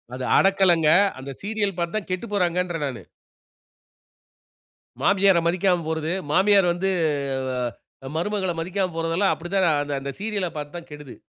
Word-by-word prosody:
அது 130 - -5
அடக்கல்லங்க, 185 -5 +4 0.3
அந்த 135 +1 -7
சீரியல் 205 -2 -1
பார்த்து 170 +2 -2
தான் 210 - -6
கெட்டுப்போறாங்கன்றேன் 180 -5 -1
நானு. 125 -8 -5 2.0
மாமியார 195 -2 +4
மதிக்காம 180 0 +1
போறது, 160 0 -2 0.2
மாமியார் 195 +2 +4
வந்து, 185 +2 -1 1.2
ஆ - - -5
மருமகள 190 +1 -1
மதிக்காம 185 +1 -2
போறதெல்லாம் 165 +4 +1
அப்படித்தான் 160 -5 0
அந்த 140 0 -4
சீரியல்ல 205 -4 -1
பார்த்து 150 +2 -6
தான் 170 - -11
கெடுது. 145 -3 -10
175 Hz, 120 wpm, -23 LUFS, 160-195 Hz, 2.0 s, அடக்கல்லங்க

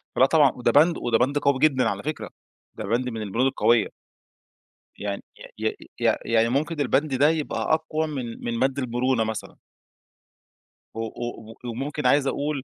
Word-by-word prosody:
فـلأ 130 - +6
طبعًا، 145 -1 +4
وده 120 -1 0
بند 160 +6 +5
وده 115 -2 +1
بند 130 +5 +1
قوي 140 -2 +2
جدًا 130 -5 +3
على 100 -1 -4
فكرة. 155 +1 -4 0.5
ده - - -6
بند 120 +5 0
من 115 -2 -5
البنود 110 +5 0
القوية. 120 -4 +3 1.1
يعني 100 -1 -4 0.4
ي - - +1 0.3
ي - - 0 0.2
يعني 115 0 +3
ممكن 150 +5 -1
البند 140 +1 +1
ده 145 +4 +4
يبقى 160 -1 -1
أقوى 160 0 0
من 130 -6 -6
من 115 -1 -2
بند 135 +1 +1
المرونة 125 -1 0
مثلًا. 110 -1 -5 1.4
و 115 - -7
و 115 0 -6
وممكن 130 +4 -4
عايز 140 +2 +4
أقول 145 -1 -2
130 Hz, 160 wpm, -24 LUFS, 115-145 Hz, 1.4 s, فـلأ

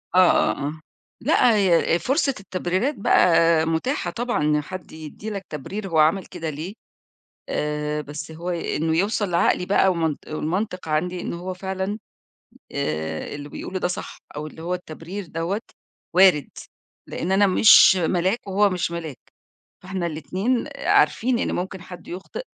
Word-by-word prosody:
آه، - - +7
آه، - - +3 0.2
آه. 155 +2 -6 0.4
لأ، 235 -3 +4
هي 180 -5 +3
آآ، - - +3
فرصة 275 - +1
التبريرات 190 +8 -1
بقى 165 -4 +4
مُتاحة 175 - -1
طبعًا، 240 -8 -1
إن 150 0 +2
حد 185 +4 -8
يدّي 160 +7 -8
لك 200 -3 -5
تبرير 195 +8 -5
هو 160 -3 +1
عمل 165 +5 +3
كده 165 -3 -5
ليه 160 +7 -6 0.8
آآ، 150 0 -2
بس 150 +2 -7
هو 170 +3 -5
ي 170 -1 -2
إن 160 +1 0
يوصل 205 +3 +1
لعقلي 170 +1 +2
بقى 195 0 +3
ومن 165 -4 0
والمنطق 180 +4 -3
عندي 175 +4 -1
إن - - -4
هو 180 +2 -5
فعلًا 190 +3 -4 0.7
آآ، 80 +1 -3
اللي 145 0 -7
بيقوله 185 +5 -5
ده 180 - 0
صح 180 - -6 0.2
أو 150 - -4
اللي 160 +1 -10
هو 180 +2 -2
التبرير 180 +3 -7
دَوّة 165 +6 -2 0.5
وارد، 180 -6 +5 0.6
لإن 180 +3 -3
أنا 200 +1 +5
مش 190 0 +7
ملاك، 185 +4 +1
وهو 200 +1 +3
مش 180 -2 -1
ملاك، 165 -5 -6 0.6
فاحنا 185 -1 -3
الاتنين 185 - -1
آآ، - - -7
عارفين 245 +1 +3
إن - - -1
ممكن 185 0 -4
حد 180 -1 -11
يُخطئ، 190 - -6
180 Hz, 160 wpm, -23 LUFS, 160-195 Hz, 0.8 s, آه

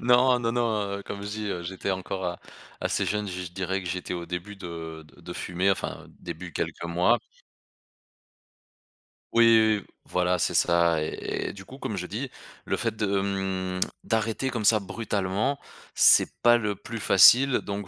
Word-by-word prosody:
Non, 125 +1 +4
non, 115 -1 -1
non, 110 -4 0
heu, 100 - -8
comme 100 0 -7
je 100 - -5
dis: 105 0 -4
«Heu, 90 -2 -3
j'étais 95 +3 -4
encore 95 -1 -3 0.4
assez - - 0
jeune», 105 -1 -1
je 90 0 -5
je 90 - -7
dirais 95 +1 -2
que 90 - -5
j'étais 90 0 -3
au 85 -1 -5
début 90 +4 -5
de 80 -3 -7
de - - -19
de - - -8
fumer 90 +2 0
enfin, 95 - -3
début, 85 +1 -7
quelques - - -3
mois. 90 +8 +2 2.2
Oui, 115 0 +6
oui, 110 -2 +5
oui, - - -15 0.2
voilà, 90 0 0
c'est - - +1
ça, 85 -2 +3
et- 75 - -3
et - - -7
du 95 - -10
coup, 130 +7 -12
comme 110 -6 -4
je 90 - -4
dis: 120 +8 -4 0.4
«Le - - 0
fait - - -1
de, 105 - 0 0.2
mmh, 95 -2 -2 0.2
d'arrêter 115 +4 -1
comme 115 -5 -3
ça, 110 -1 +5
brutalement, 105 +4 -1 0.4
c'est - - +6
pas 120 0 +6
le 105 -3 -2
plus 115 +4 -7
facile», 125 +7 +6
donc 100 -1 -5
100 Hz, 180 wpm, -26 LUFS, 90-110 Hz, 2.2 s, Oui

